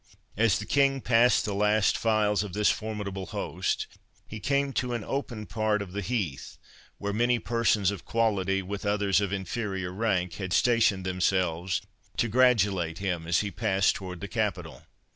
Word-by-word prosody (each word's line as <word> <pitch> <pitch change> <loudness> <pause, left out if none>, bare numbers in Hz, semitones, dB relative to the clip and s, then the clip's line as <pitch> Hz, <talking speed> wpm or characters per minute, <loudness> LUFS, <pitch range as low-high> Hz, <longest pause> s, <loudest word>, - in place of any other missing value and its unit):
As 105 -2 +3
the 105 - -5
King 135 +1 +2
passed 120 -1 +3
the 105 - -2
last 105 +1 +2
files 105 -2 +2
of 105 -4 -5
this 105 +1 +3
formidable 100 -4 -4
host, - - -2 0.4
he 110 - -7
came 140 +5 0
to 125 -1 -1
an 115 - -4
open 120 -4 -4
part 110 -1 0
of 100 -3 -6
the 100 +2 -3
heath, 95 - -3 0.4
where 100 0 -3
many 120 +3 +2
persons 115 -4 +1
of 100 -4 -7
quality, 95 -4 0
with 100 +2 -5
others 100 -2 +2
of 100 -2 -1
inferior 95 -1 -3
rank, 95 -4 0
had 95 -2 -3
stationed 110 -4 +3
themselves 90 -1 0 0.3
to 120 - +2
gratulate 105 -9 +2
him 90 -4 -3
as 85 0 +2
he 105 -1 -3
passed 95 0 +2
towards 90 -3 -7
the 100 - -4
capital. 90 - -3
100 Hz, 165 wpm, -27 LUFS, 95-115 Hz, 0.4 s, As